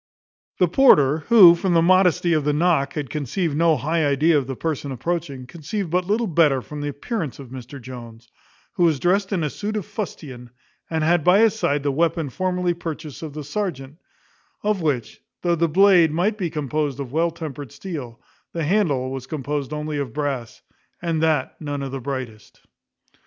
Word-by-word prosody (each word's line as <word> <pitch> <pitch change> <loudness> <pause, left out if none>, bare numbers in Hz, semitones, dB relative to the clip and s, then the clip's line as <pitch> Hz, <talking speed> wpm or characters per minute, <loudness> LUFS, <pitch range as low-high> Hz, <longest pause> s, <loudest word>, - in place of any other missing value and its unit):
The 180 - +4
porter, 160 - +5
who, 205 -8 +9
from 175 +1 0
the 165 - +5
modesty 180 -1 +4
of 155 -2 +1
the 150 +1 +1
knock, 155 -3 +1
had 145 -6 -4
conceived 150 +2 -2
no 165 0 +3
high 160 +6 0
idea 150 +3 +3
of 140 -3 +1
the 135 - -4
person 145 -1 -3
approaching, 140 -1 -3
conceived 170 +5 -5
but 180 0 0
little 220 +3 +1
better 150 - +2
from 150 -1 -7
the 145 - -3
appearance 150 - -4
of 135 -3 -11
Mr 130 +2 -9
Jones, 120 -2 -10 0.5
who 175 - 0
was 155 -5 +2
drest 195 +5 +1
in 180 -5 0
a 150 - 0
suit 215 +1 -4
of 205 - -4
fustian, 150 - -7 0.4
and 160 -1 -1
had 170 0 +2
by 180 +5 +5
his 225 -2 +4
side 145 -10 -1
the 145 - +1
weapon 160 0 0
formerly 180 0 -1
purchased 160 -4 -7
of 155 -3 -7
the 150 0 -6
serjeant; 150 -3 -4 0.6
of 210 -2 0
which, 140 -8 -2 0.2
though 175 -1 +2
the 170 0 +1
blade 180 -1 +5
might 180 +7 +1
be 185 -5 -2
composed 150 -2 -2
of 135 -3 -5
well 165 +2 +2
tempered 150 -5 -7
steel, 140 -6 -7 0.3
the 165 - -2
handle 145 -8 +1
was 130 -1 -6
composed 145 -1 -3
only 150 -1 -3
of 130 -5 -4
brass, 140 -6 -4 0.4
and 165 -2 -1
that 155 -5 +1
none 145 -2 -4
of 135 - -5
the 135 -1 -5
brightest. 125 -5 -7
155 Hz, 190 wpm, -22 LUFS, 140-175 Hz, 0.6 s, who